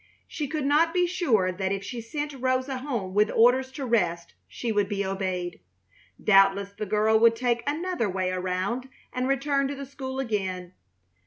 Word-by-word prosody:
She 300 Hz, -2 st, -4 dB
could 300 Hz, 0 st, -3 dB
not 320 Hz, +4 st, +3 dB
be 360 Hz, 0 st, +4 dB
sure 250 Hz, -, +1 dB
that 190 Hz, +1 st, -2 dB
if 200 Hz, 0 st, -2 dB
she 240 Hz, +2 st, -5 dB
sent 290 Hz, +6 st, -4 dB
Rosa 255 Hz, 0 st, -1 dB
home 235 Hz, -9 st, -3 dB
with 210 Hz, +2 st, +3 dB
orders 255 Hz, +3 st, +4 dB
to 275 Hz, -1 st, -4 dB
rest 175 Hz, -8 st, 0 dB
she 235 Hz, -, -4 dB
would 205 Hz, -2 st, +1 dB
be 200 Hz, -1 st, -1 dB
obeyed. 185 Hz, -2 st, -3 dB, 0.6 s
Doubtless 195 Hz, 0 st, +4 dB
the 210 Hz, +1 st, -5 dB
girl 215 Hz, +2 st, +3 dB
would 230 Hz, 0 st, +5 dB
take 240 Hz, 0 st, 0 dB
another 315 Hz, -, -1 dB
way 185 Hz, 0 st, -1 dB
around 185 Hz, +8 st, -2 dB, 0.2 s
and 250 Hz, +1 st, -1 dB
return 275 Hz, +1 st, +1 dB
to 285 Hz, -, -4 dB
the 275 Hz, 0 st, -6 dB
school 265 Hz, -1 st, -6 dB
again. 190 Hz, -7 st, -3 dB
230 Hz, 175 wpm, -26 LUFS, 195-270 Hz, 0.6 s, would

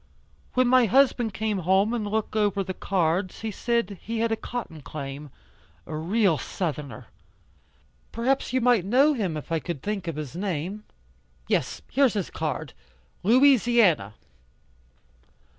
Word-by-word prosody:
When 255 Hz, -1 st, +4 dB
my 255 Hz, 0 st, +5 dB
husband 245 Hz, -1 st, +3 dB
came 210 Hz, 0 st, -2 dB
home 190 Hz, +5 st, +2 dB
and 220 Hz, -3 st, -2 dB
looked 215 Hz, +1 st, -2 dB
over 205 Hz, -2 st, +1 dB
the 185 Hz, 0 st, -5 dB
cards, 185 Hz, 0 st, -1 dB
he 220 Hz, -1 st, -3 dB
said 230 Hz, -2 st, -1 dB
he 230 Hz, +2 st, -4 dB
had 230 Hz, 0 st, 0 dB
a -, -, +2 dB
cotton 220 Hz, -10 st, -6 dB
claim. 140 Hz, 0 st, -7 dB, 0.6 s
A 155 Hz, -, -6 dB
real 175 Hz, -, +1 dB
southerner. 145 Hz, -, -4 dB, 1.1 s
Perhaps 260 Hz, +4 st, 0 dB
you 260 Hz, 0 st, +1 dB
might 240 Hz, -5 st, +4 dB
know 265 Hz, -, +4 dB
him 190 Hz, -, -2 dB
if 150 Hz, -, -9 dB
I 165 Hz, -, +1 dB
could 160 Hz, -4 st, -6 dB
think 205 Hz, -3 st, -3 dB
of 165 Hz, -, -3 dB
his 150 Hz, -1 st, -6 dB
name. 190 Hz, +2 st, -3 dB, 0.6 s
Yes, -, -, -1 dB
here's 265 Hz, -4 st, +3 dB
his 200 Hz, -4 st, -2 dB
card 155 Hz, -2 st, -4 dB, 0.5 s
Louisiana." 230 Hz, -, +4 dB
200 Hz, 140 wpm, -25 LUFS, 165-235 Hz, 1.1 s, my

